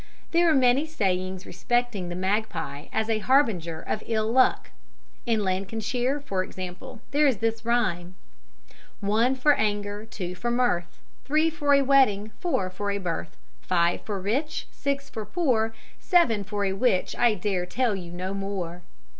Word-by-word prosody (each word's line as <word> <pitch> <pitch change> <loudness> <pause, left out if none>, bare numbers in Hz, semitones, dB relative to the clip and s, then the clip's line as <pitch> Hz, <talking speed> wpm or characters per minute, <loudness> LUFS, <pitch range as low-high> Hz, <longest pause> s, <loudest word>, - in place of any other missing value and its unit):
There 340 0 +4
are 315 - +4
many 260 +3 +4
sayings 185 - -1
respecting 225 -1 -1
the 175 - -4
magpie 185 -7 -2
as 220 0 0
a 225 -1 +1
harbinger 210 - +2
of 215 - -3
ill 220 -1 0
luck. 255 +1 +3 0.6
In 225 -3 +2
Lancashire, 220 +8 -1
for 195 -10 -2
example, 185 +5 -8
there 295 +1 +4
is 260 -6 +2
this 225 +2 -1
rhyme: 190 -7 0 0.8
"One 220 +6 +2
for 290 +3 +4
anger, 205 -1 -2
two 180 -5 -5
for 240 +6 -3
mirth, 235 -8 0 0.2
Three 310 +3 +2
for 290 -2 +3
a 280 - +4
wedding, 255 -7 +3
four 195 - -1
for 205 +2 -3
a 200 - 0
birth, 125 - -4 0.2
Five 170 -1 +1
for 205 -2 -4
rich, 265 +11 -2
six 280 0 -2
for 220 - -6
poor, 235 - +1 0.3
Seven 245 - +3
for 205 0 -2
a 190 - 0
witch, 195 -2 +1
I 240 -3 +3
dare 185 -2 -1
tell 240 0 0
you 175 -3 -7
no 185 +2 -4
more." 195 -3 -4
215 Hz, 160 wpm, -26 LUFS, 185-250 Hz, 0.8 s, There